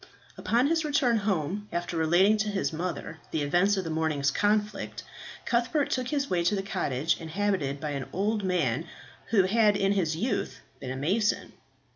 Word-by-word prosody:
Upon 240 Hz, +3 st, +1 dB
his 325 Hz, +2 st, +2 dB
return 285 Hz, -6 st, +2 dB
home, 200 Hz, -1 st, -1 dB
after 175 Hz, 0 st, -3 dB
relating 175 Hz, +6 st, +4 dB
to 215 Hz, 0 st, -1 dB
his 195 Hz, -4 st, -1 dB
mother 165 Hz, -1 st, -4 dB
the 155 Hz, -, -1 dB
events 180 Hz, +7 st, +2 dB
of 190 Hz, -, -1 dB
the 165 Hz, -, -4 dB
morning's 155 Hz, -3 st, 0 dB
conflict, 210 Hz, +3 st, -1 dB, 0.4 s
Cuthbert 245 Hz, +5 st, +1 dB
took 255 Hz, -1 st, -1 dB
his 280 Hz, 0 st, -1 dB
way 175 Hz, -6 st, 0 dB
to 205 Hz, -, +3 dB
the 195 Hz, -, -2 dB
cottage 150 Hz, -5 st, -1 dB
inhabited 165 Hz, -4 st, -1 dB
by 150 Hz, 0 st, -3 dB
an 140 Hz, -2 st, -4 dB
old 205 Hz, +2 st, 0 dB
man 165 Hz, -5 st, 0 dB, 0.4 s
who 210 Hz, -4 st, +4 dB
had 210 Hz, +1 st, +3 dB
in 195 Hz, -1 st, +2 dB
his 175 Hz, -6 st, +1 dB
youth 225 Hz, +11 st, -2 dB, 0.2 s
been 130 Hz, -, -6 dB
a 130 Hz, -, -3 dB
mason. 195 Hz, +11 st, 0 dB
195 Hz, 175 wpm, -28 LUFS, 160-215 Hz, 0.4 s, relating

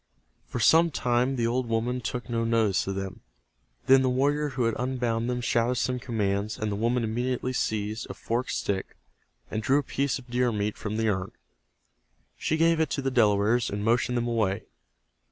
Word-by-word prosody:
For -, -, -4 dB
some 165 Hz, +9 st, +5 dB
time 125 Hz, -2 st, +1 dB
the 120 Hz, -2 st, 0 dB
old 120 Hz, +1 st, 0 dB
woman 120 Hz, +3 st, 0 dB
took 125 Hz, +1 st, -4 dB
no 115 Hz, -1 st, -1 dB
notice 115 Hz, -5 st, +1 dB
of 95 Hz, -, -2 dB
them. 95 Hz, -1 st, -5 dB, 0.7 s
Then 135 Hz, 0 st, +6 dB
the 130 Hz, -, +2 dB
warrior 145 Hz, +4 st, +1 dB
who 130 Hz, -2 st, -2 dB
had 115 Hz, 0 st, +1 dB
unbound 120 Hz, -2 st, -1 dB
them 125 Hz, 0 st, -1 dB
shouted 120 Hz, +1 st, +1 dB
some 125 Hz, +1 st, -1 dB
commands, 105 Hz, -4 st, -1 dB
and 110 Hz, -1 st, -2 dB
the -, -, -1 dB
woman 115 Hz, +3 st, +1 dB
immediately 125 Hz, +3 st, -1 dB
seized 110 Hz, -2 st, -2 dB
a -, -, -6 dB
forked 120 Hz, +3 st, -2 dB
stick 95 Hz, -1 st, -3 dB, 0.5 s
and 110 Hz, -, -2 dB
drew 130 Hz, +4 st, +3 dB
a 145 Hz, -, +1 dB
piece 140 Hz, 0 st, -1 dB
of 130 Hz, -, -12 dB
deer 125 Hz, 0 st, +1 dB
meat 105 Hz, -1 st, -1 dB
from 105 Hz, 0 st, -4 dB
the 110 Hz, 0 st, +1 dB
urn. 95 Hz, -2 st, -2 dB, 1.0 s
She 160 Hz, -, -1 dB
gave 165 Hz, 0 st, +3 dB
it 160 Hz, -2 st, +1 dB
to 140 Hz, -, -2 dB
the 135 Hz, -, 0 dB
Delawares, 110 Hz, -1 st, +3 dB
and 100 Hz, +1 st, -3 dB
motioned 120 Hz, +2 st, +2 dB
them 120 Hz, 0 st, 0 dB
away. 110 Hz, -3 st, 0 dB
120 Hz, 190 wpm, -27 LUFS, 110-125 Hz, 1.0 s, Then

